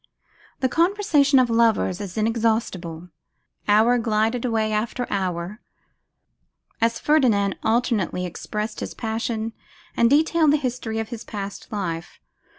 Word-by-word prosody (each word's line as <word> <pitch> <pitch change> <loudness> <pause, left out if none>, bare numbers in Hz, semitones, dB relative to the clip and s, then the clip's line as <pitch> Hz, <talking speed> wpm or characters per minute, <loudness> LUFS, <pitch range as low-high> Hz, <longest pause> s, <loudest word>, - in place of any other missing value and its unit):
The 260 - +3
conversation 330 -3 +3
of 255 -1 +5
lovers 225 -4 +2
is 195 0 -7
inexhaustible. 215 -7 -1 0.6
Hour 220 +4 +4
glided 225 +1 0
away 220 -2 0
after 230 +3 -1
hour, 185 +1 -2 1.2
as 230 0 +2
Ferdinand 230 -11 +2
alternately 220 -6 0
expressed 210 +5 -5
his - - -6
passion 225 0 -3 0.4
and 235 - +4
detailed 310 +1 +4
the - - +4
history 245 -5 -3
of 225 -1 -3
his 235 -3 -6
past 200 +1 -7
life. 175 -5 -4
225 Hz, 120 wpm, -23 LUFS, 205-245 Hz, 1.2 s, of